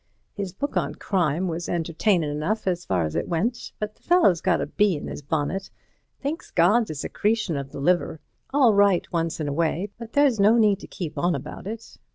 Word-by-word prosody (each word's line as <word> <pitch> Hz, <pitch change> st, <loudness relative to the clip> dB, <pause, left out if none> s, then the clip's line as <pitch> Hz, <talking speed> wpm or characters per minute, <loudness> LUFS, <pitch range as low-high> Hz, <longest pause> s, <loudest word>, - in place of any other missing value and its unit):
His 195 Hz, -2 st, -4 dB
book 280 Hz, +10 st, -4 dB
on -, -, -1 dB
Crime 180 Hz, -2 st, 0 dB
was 170 Hz, 0 st, -4 dB
entertainin' 170 Hz, +1 st, +1 dB
enough 155 Hz, +9 st, -2 dB
as 175 Hz, -2 st, -1 dB
far 90 Hz, -3 st, +1 dB
as 75 Hz, -, -4 dB
it -, -, -1 dB
went, 215 Hz, +9 st, -2 dB
but 210 Hz, 0 st, -4 dB
the -, -, -33 dB
fellow's 265 Hz, -, +4 dB
got 185 Hz, -1 st, +2 dB
a -, -, -1 dB
bee 205 Hz, -3 st, +2 dB
in 145 Hz, -, -6 dB
his -, -, -6 dB
bonnet. 160 Hz, +6 st, -2 dB, 0.5 s
Thinks 290 Hz, +4 st, -4 dB
God's 210 Hz, +7 st, +3 dB
a 155 Hz, -, -4 dB
secretion 210 Hz, +5 st, -1 dB
of 140 Hz, -1 st, -4 dB
the -, -, -7 dB
liver—all 180 Hz, -, +1 dB
right 200 Hz, -3 st, +4 dB
once 165 Hz, -1 st, -1 dB
in 155 Hz, -, -2 dB
a 145 Hz, -, -1 dB
way, 170 Hz, +5 st, -1 dB
but 230 Hz, -1 st, -9 dB
there's 280 Hz, -6 st, +3 dB
no 210 Hz, +4 st, +5 dB
need 210 Hz, -3 st, +4 dB
to -, -, -10 dB
keep 170 Hz, -5 st, -5 dB
on 175 Hz, 0 st, +2 dB
about -, -, -7 dB
it. 225 Hz, +2 st, -8 dB
185 Hz, 205 wpm, -24 LUFS, 160-215 Hz, 0.5 s, no